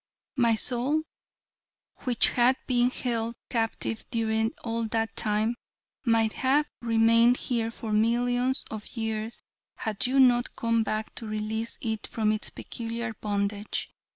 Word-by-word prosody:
My 235 -4 +3
soul, 255 +7 +1 1.0
which 245 -2 +4
had 250 +2 +3
been 245 -1 +3
held 235 -2 -2
a - - -19
captive 225 -1 -1
during 225 -2 0
all 230 0 -1
that 225 0 -1
time, 215 +2 +1 0.5
might 225 -2 +3
have 280 +3 +2 0.2
remained 230 +1 +5
here 230 -3 -1
for 225 -1 -5
millions 245 +4 +2
of 215 +2 -8
years 225 0 -3 0.3
had 215 +1 0
you 270 +2 +2
not 245 -2 +4
come 230 0 +1
back 215 0 -2
to 225 - -5
release 215 +2 -2
it 220 -2 -3
from 215 -2 +1
its 215 0 0
peculiar 230 0 -5
bondage. 205 0 -2
230 Hz, 135 wpm, -27 LUFS, 220-245 Hz, 1.0 s, remained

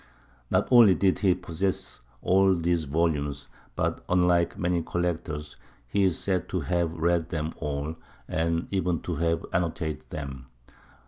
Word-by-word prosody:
Not - - +2
only 115 -6 +8
did 95 -2 +2
he 95 -4 +3
possess 90 -4 -3 0.2
all 95 +1 +4
these 85 -1 0
volumes, 75 -2 -1 0.3
but, - - -1
unlike 90 -1 +3
many 90 -1 0
collectors, 80 -4 -3 0.3
he 95 +10 +2
is 90 -3 +1
said 95 -3 -1
to 90 - -1
have 85 +3 0
read 85 0 +1
them 80 -1 -3
all, 75 +1 -3 0.3
and 85 +1 0
even 90 -3 0
to 85 -4 -3
have 85 +1 0
annotated 80 -3 -2
them. 65 -4 -6
85 Hz, 140 wpm, -27 LUFS, 80-90 Hz, 0.3 s, only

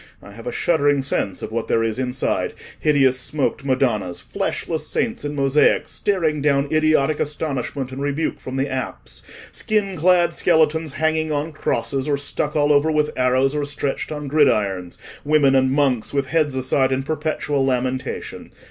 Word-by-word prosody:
I 100 - -13
have 115 +4 -10
a - - -1
shuddering 145 -4 +2
sense 100 -7 -2
of - - -5
what 115 0 -2
there 115 - +2
is 115 +2 -2
inside—hideous 130 +1 0
smoked 135 +2 -2
Madonnas; 120 -10 0
fleshless - - -3
saints - - -2
in 145 0 -4
mosaic, 140 +1 +3
staring 165 -7 -1
down 140 -1 +2
idiotic 155 -1 +2
astonishment 140 -3 -3
and 135 +1 -6
rebuke 145 +3 -1
from 130 - -7
the 135 +1 0
apse; 130 - -5 0.3
skin 205 -3 -1
clad 175 +1 +3
skeletons 160 -2 +2
hanging 160 0 0
on 150 +2 -1
crosses, 135 -2 -2
or 145 -1 +1
stuck 145 +1 -3
all 150 -1 +3
over 145 +2 +3
with 150 -1 +1
arrows, 130 +2 +2
or 150 -1 -1
stretched 145 +1 -3
on 150 -1 -5
gridirons; 105 - +1 0.3
women 145 -2 +4
and 130 -1 +3
monks 135 -3 +1
with 140 -2 0
heads 155 -4 +1
aside 130 +1 +1
in 135 0 0
perpetual 150 -1 -1
lamentation. 130 0 -2
140 Hz, 160 wpm, -21 LUFS, 130-155 Hz, 0.3 s, women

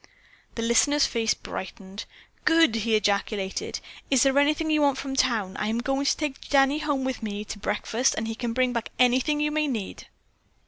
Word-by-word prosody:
The 230 - -3
listener's 280 +5 +3
face 225 -2 0
brightened. 190 +2 -8 0.4
"Good!" 325 -6 +4
he 225 0 +1
ejaculated. 200 -1 -1 0.3
"Is 270 -3 +4
there 275 0 +3
anything 305 +2 +1
you 305 -1 +3
want 280 -2 +3
from 270 0 -4
town? 225 -8 0
I 210 - -2
am 220 +1 -1
going 270 +3 -1
to - - +2
take 295 -3 -5
Danny 275 +1 +3
home 290 -3 -1
with 260 -1 -3
me 210 -1 -4
to 205 - -7
breakfast 215 +5 0
and 220 - -2
he 225 - -3
can 235 +1 -4
bring 250 +1 +1
back 235 -1 -3
anything 255 +4 +2
you 300 0 0
may 305 0 0
need." 225 -8 -5
250 Hz, 190 wpm, -25 LUFS, 220-280 Hz, 0.4 s, Good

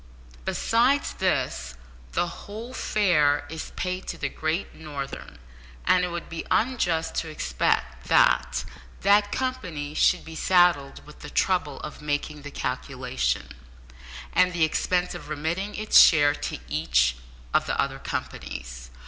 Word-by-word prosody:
Besides 255 +5 +2
this, 130 - -1 0.4
the - - +2
whole 220 +7 -8
fare 150 - +2
is 160 0 -6
paid 185 0 -3
to 170 - -4
the 140 -3 -2
Great 155 +6 -2
Northern, 145 -3 -7 0.5
and 180 - +4
it - - +1
would 175 -1 -5
be 165 - -5
unjust 175 -10 +1
to 160 - -1
expect 65 - -1
that 65 +1 +3 0.4
that 205 0 +4
company 180 - -3
should 180 +3 +3
be 160 - -9
saddled 175 -6 +3
with 150 - -14
the 150 - -8
trouble 180 -7 0
of 150 - -8
making 150 0 -2
the 145 - -8
calculation, 65 - -2 0.8
and 180 0 +4
the 170 -2 +1
expense 180 +3 +1
of - - -9
remitting 160 +7 -2
its 215 0 +5
share 145 -3 +6
to - - -4
each - - +2 0.4
of - - +2
the - - -1
other - - 0
companies. - - -6
160 Hz, 140 wpm, -26 LUFS, 145-185 Hz, 0.8 s, share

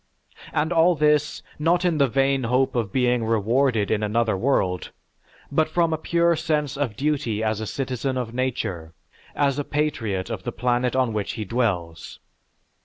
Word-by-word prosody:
And 160 +3 0
all 170 +1 +4
this, 150 -1 +1 0.2
not 175 +4 +2
in 165 -4 +1
the 140 - +5
vain 135 0 +1
hope 125 +3 +1
of 115 -5 -1
being 125 -1 +1
rewarded 115 +1 +1
in 110 - +1
another 110 +1 +1
world, 95 -5 0 0.6
but 155 +2 +2
from 165 0 +1
a - - 0
pure 170 +1 +2
sense 150 -3 -1
of 135 -7 -2
duty 135 -6 -1
as 110 0 -1
a 110 - -4
citizen 130 +1 -3
of 120 -2 -3
nature, 100 -11 -3 0.4
as 140 -1 +1
a - - 0
patriot 120 -10 -2
of 110 -5 -4
the - - -4
planet 125 0 0
on 130 -4 +1
which 105 -2 -2
he 110 -2 -5
dwells. 90 - -2
125 Hz, 170 wpm, -24 LUFS, 110-150 Hz, 0.6 s, the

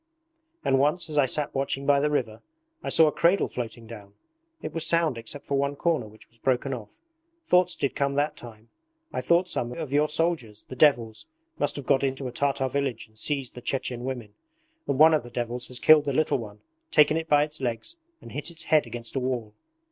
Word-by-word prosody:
And 135 - +3
once 155 +4 +1
as 150 - +1
I 135 - +4
sat 150 +3 -2
watching 135 0 -2
by 140 0 +4
the 150 +1 +1
river 120 -7 -2 0.4
I - - -4
saw 160 - +6
a 150 - +3
cradle 170 +6 +3
floating 115 -1 -6
down. 105 -3 -11 0.5
It - - -5
was 165 - -1
sound 165 -5 +2
except 115 +5 -9
for 140 -1 0
one 140 +1 0
corner 155 -7 0
which 110 +1 -17
was 115 - -22
broken 130 +2 0
off. 110 -5 -9 0.5
Thoughts 180 - +3
did 140 - -2
come 140 -1 0
that 145 +2 0
time! 115 -1 -12 0.4
I - - -1
thought 170 +2 +3
some 120 -8 -2
of 155 -1 -6
your 150 +1 +3
soldiers, 155 -9 -1
the 130 - -8
devils, 120 -6 +2 0.3
must - - 0
have 140 - -6
got 135 0 +3
into 135 0 -1
a - - -5
Tartar 135 +1 0
village 135 -4 -2
and 110 - -29
seized 135 +3 -2
the 125 - -9
Chechen 125 -1 -3
women, 125 -5 -5 0.5
and 135 - 0
one 160 +2 +7
of 155 - +3
the 120 - -11
devils 120 +1 -4
has 125 -1 -8
killed 155 -1 +6
the 140 - -1
little 155 -1 +1
one: 105 -2 -9 0.3
taken 150 0 +5
it 160 0 -3
by 145 0 +5
its 150 -1 -6
legs, 120 - -3 0.3
and - - -11
hit 145 +3 -4
its 170 -1 -6
head 155 -1 +3
against 115 +1 -7
a - - +1
wall. 125 -4 -3
135 Hz, 220 wpm, -26 LUFS, 120-150 Hz, 0.5 s, one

